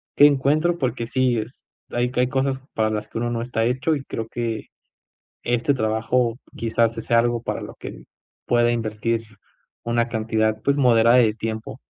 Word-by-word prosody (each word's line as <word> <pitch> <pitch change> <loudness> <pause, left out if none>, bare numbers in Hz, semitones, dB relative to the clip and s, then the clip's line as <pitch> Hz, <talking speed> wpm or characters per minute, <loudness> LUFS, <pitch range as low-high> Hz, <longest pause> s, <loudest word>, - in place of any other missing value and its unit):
qué 145 - +8
encuentro 150 +5 +3
porque 120 -5 -2
sí 130 -2 +1
es, 110 +4 -6 0.3
hay 120 +1 0
hay 125 0 +3
cosas 135 0 0
para 110 -1 +1
las 105 -1 -3
que - - -7
uno 120 +1 -1
no 115 -1 -2
está 115 -1 -1
hecho 130 +6 +1
y 140 - -5
creo 115 -4 -5
que 115 -2 -3 0.8
este 120 +4 +1
trabajo 115 +1 0 0.2
quizás 115 0 +1
sí 115 - -5
sea 115 - +2
algo 120 -1 0
para - - -3
lo - - -8
que - - -9 0.4
pueda 120 0 +3
invertir 115 0 -1 0.6
una 120 0 +1
cantidad, 110 -1 0
pues 140 0 +2
moderada, 120 -3 +5
de 110 -3 +4
tiempo. 110 0 -5
120 Hz, 175 wpm, -23 LUFS, 115-125 Hz, 0.8 s, qué